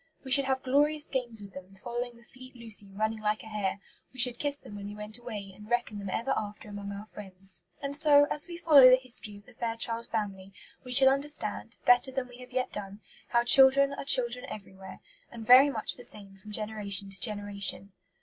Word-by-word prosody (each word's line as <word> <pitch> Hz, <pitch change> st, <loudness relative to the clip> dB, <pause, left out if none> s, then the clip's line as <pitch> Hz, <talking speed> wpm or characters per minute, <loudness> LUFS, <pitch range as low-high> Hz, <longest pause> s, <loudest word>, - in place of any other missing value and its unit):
We 265 Hz, -, -9 dB
should 275 Hz, +1 st, +5 dB
have 265 Hz, 0 st, -1 dB
glorious 295 Hz, +3 st, +2 dB
games 240 Hz, -5 st, -3 dB
with 200 Hz, -1 st, -12 dB
them, 185 Hz, +1 st, -12 dB
following 240 Hz, +4 st, -6 dB
the 235 Hz, -, -20 dB
fleet 255 Hz, +1 st, -15 dB
Lucy 220 Hz, -4 st, -2 dB
running 215 Hz, +3 st, -2 dB
like 215 Hz, 0 st, -2 dB
a -, -, -13 dB
hare; 210 Hz, -3 st, -3 dB, 0.3 s
we 260 Hz, -, -18 dB
should 245 Hz, 0 st, +2 dB
kiss 285 Hz, -1 st, 0 dB
them 205 Hz, -, -12 dB
when 200 Hz, 0 st, -7 dB
we 205 Hz, -, -8 dB
went 210 Hz, +2 st, -5 dB
away, 210 Hz, -5 st, -8 dB
and 210 Hz, +2 st, -14 dB
reckon 240 Hz, -3 st, -1 dB
them 200 Hz, -1 st, -6 dB
ever 230 Hz, +7 st, -1 dB
after 210 Hz, 0 st, -6 dB
among 205 Hz, -1 st, -7 dB
our 200 Hz, +1 st, -8 dB
friends. 190 Hz, -2 st, -3 dB, 0.2 s
And 280 Hz, 0 st, -2 dB
so, 290 Hz, -1 st, +5 dB
as 300 Hz, -, -1 dB
we 345 Hz, -1 st, -8 dB
follow 290 Hz, -6 st, +7 dB
the 255 Hz, -, +8 dB
History 245 Hz, -5 st, -6 dB
of 205 Hz, -, -18 dB
the -, -, -18 dB
Fairchild 230 Hz, 0 st, -3 dB
Family 195 Hz, -3 st, -5 dB, 0.3 s
we 250 Hz, -, -9 dB
shall 265 Hz, +1 st, +6 dB
understand, 270 Hz, -, -3 dB
better 245 Hz, +2 st, +4 dB
than 260 Hz, -1 st, -4 dB
we 245 Hz, 0 st, -14 dB
have 250 Hz, 0 st, -12 dB
yet 255 Hz, 0 st, -2 dB
done, 200 Hz, 0 st, -7 dB, 0.3 s
how 235 Hz, 0 st, +2 dB
children 270 Hz, +2 st, +7 dB
are -, -, -6 dB
children 250 Hz, -3 st, +1 dB
everywhere, 190 Hz, -2 st, -11 dB, 0.3 s
and 230 Hz, -2 st, -9 dB
very 255 Hz, +5 st, +8 dB
much 225 Hz, -6 st, +1 dB
the 245 Hz, -, -12 dB
same 200 Hz, -4 st, -7 dB
from 210 Hz, +2 st, -13 dB
generation 205 Hz, -2 st, -1 dB
to 190 Hz, -2 st, -6 dB
generation. 200 Hz, 0 st, 0 dB
230 Hz, 215 wpm, -29 LUFS, 205-255 Hz, 0.3 s, the